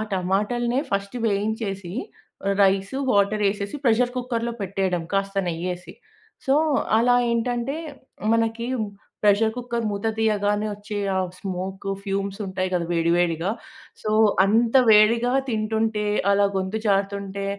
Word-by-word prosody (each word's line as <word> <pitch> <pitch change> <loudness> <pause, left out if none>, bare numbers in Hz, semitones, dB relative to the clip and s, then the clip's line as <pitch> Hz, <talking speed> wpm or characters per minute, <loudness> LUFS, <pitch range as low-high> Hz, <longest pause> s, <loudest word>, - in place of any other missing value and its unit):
టమాటల్నే 210 +7 0
first 200 +2 -2
వేయించేసి 200 -3 -2 0.7
rice, 195 +3 +2 0.2
water 205 +1 +2
యేసేసి 200 +2 -3
pressure 245 0 +3
కుక్కర్‌లో 240 -2 -2
పెట్టేయడం 190 -3 -1
కాస్త 195 0 -1
నెయ్యేసి. 175 +1 -4 0.5
సో, 270 - +3 0.4
అలా 245 +2 +4 0.2
ఏంటంటే 240 +3 -1 0.6
మనకి 230 0 0
హ్మ్, 220 -4 -2 0.3
ప్రెషర్ 210 +2 +4
కుక్కర్ 235 -2 -3
మూత 200 +2 -2
తీయగానే 210 -1 +1
వచ్చే 205 +1 -6 0.2
ఆ - - +2 0.2
స్మోకు, 190 +1 -4
ఫ్యూమ్స్ 195 0 -3
ఉంటాయి 185 -1 -2
గద, 175 -1 +1
వేడి, 165 0 +2
వేడిగా 175 +1 +1 0.5
సో, 215 - -2 0.3
అంత 225 +3 +2 0.2
వేడిగా 225 +3 +5 0.2
తింటుంటే 220 -1 0 0.3
అలా 200 0 +4
గొంతు 190 +3 -2
జారుతుంటే, 200 0 -1
205 Hz, 120 wpm, -24 LUFS, 195-225 Hz, 0.7 s, వేడిగా